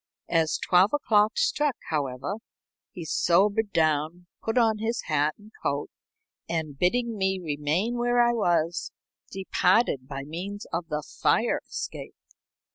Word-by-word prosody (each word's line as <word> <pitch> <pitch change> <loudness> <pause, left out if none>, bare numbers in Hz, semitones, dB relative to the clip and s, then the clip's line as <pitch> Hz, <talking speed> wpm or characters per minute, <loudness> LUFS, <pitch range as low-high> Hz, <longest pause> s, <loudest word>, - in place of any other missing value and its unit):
As 165 -2 +2
twelve 185 +5 +3
o'clock 215 -6 +2
struck, 300 - +1 0.2
however, 140 +5 -2 0.5
he 170 - -7
sobered 200 +7 +2
down, 155 +2 +1 0.2
put 225 +2 -2
on 225 -3 +3
his 230 +2 -2
hat 150 -1 +1
and 210 +1 -17
coat, 140 +1 -2 0.6
and, 160 -4 -2
bidding 225 - 0
me 190 0 +1
remain 165 +9 -1
where 240 0 +2
I 240 0 +4
was, 175 -6 0 0.4
departed 190 - +1
by 135 -1 -5
means 185 +8 -6
of 165 0 -2
the 150 -2 -3 0.2
fire - - +2
escape. - - -6
180 Hz, 130 wpm, -26 LUFS, 155-220 Hz, 0.6 s, I